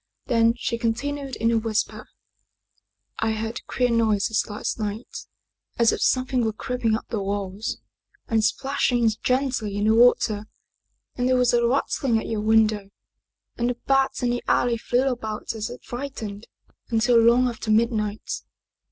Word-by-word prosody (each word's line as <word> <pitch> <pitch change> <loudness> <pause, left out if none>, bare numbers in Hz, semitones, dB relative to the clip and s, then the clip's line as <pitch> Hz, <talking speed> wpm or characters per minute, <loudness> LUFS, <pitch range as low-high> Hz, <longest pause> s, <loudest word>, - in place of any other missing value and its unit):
Then 230 -2 +3
she 235 -1 -2
continued 270 +4 -2
in 230 +1 +1
a 230 - +3
whisper, 220 -1 -2 0.5
" - - -24
I - - +1
heard 225 +2 -4
queer 250 -1 +1
noises 220 -2 +1
last 210 +2 -4
night 210 +2 -5 0.5
as 235 -1 +4
if - - -3
something 255 -1 +1
were 220 -1 0
creeping 230 -1 -1
up - - -5
the 220 -4 -2
walls 200 +1 -3 0.5
and 225 -1 +1
splashing 245 0 +1
gently 250 -6 0
in 205 - 0
the 220 - +4
water 225 -3 +3 0.7
and 250 0 0
there 255 - +4
was 250 -1 +3
a 235 0 +3
rattling 255 -1 +1
at 220 - -3
your 220 -2 -2
window 215 -2 +2 0.7
and 240 +1 +1
the 245 - -1
bats 270 -1 +2
in 240 - +2
the 245 - -1
alley 240 -1 +2
flew 245 +3 +1
about 220 -5 -3
as 220 -1 -4
if 245 - -10
frightened, 230 -5 -6 0.4
until 230 +1 +4
long 235 +2 +5
after 230 -2 -5
midnight. 215 -1 0
230 Hz, 160 wpm, -24 LUFS, 215-245 Hz, 0.7 s, long